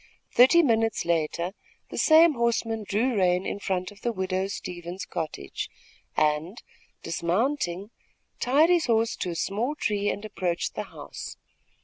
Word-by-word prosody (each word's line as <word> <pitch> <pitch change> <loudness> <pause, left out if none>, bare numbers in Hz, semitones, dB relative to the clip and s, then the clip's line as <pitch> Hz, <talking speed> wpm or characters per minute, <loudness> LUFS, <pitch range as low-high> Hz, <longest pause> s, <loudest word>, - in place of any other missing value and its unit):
Thirty 300 +8 +7
minutes 225 -4 +1
later, 170 +1 0 0.4
the - - -6
same 320 0 +7
horseman 230 -3 0
drew 235 +6 +1
rein 180 -1 +2
in - - -3
front 185 -1 -2
of 205 - -17
the 240 - 0
widow 190 -2 -1
Stevens' 180 -2 -6
cottage 160 -2 -5 0.5
and, 155 +7 +1 0.4
dismounting, 190 - -1 0.5
tied 295 +7 +4
his 345 -4 +3
horse 225 -1 +2
to 180 - -2
a 170 - -4
small 220 - -1
tree 205 -7 0
and 205 - -3
approached 180 -5 -2
the - - -4
house. - - -8
205 Hz, 140 wpm, -26 LUFS, 180-235 Hz, 0.5 s, Thirty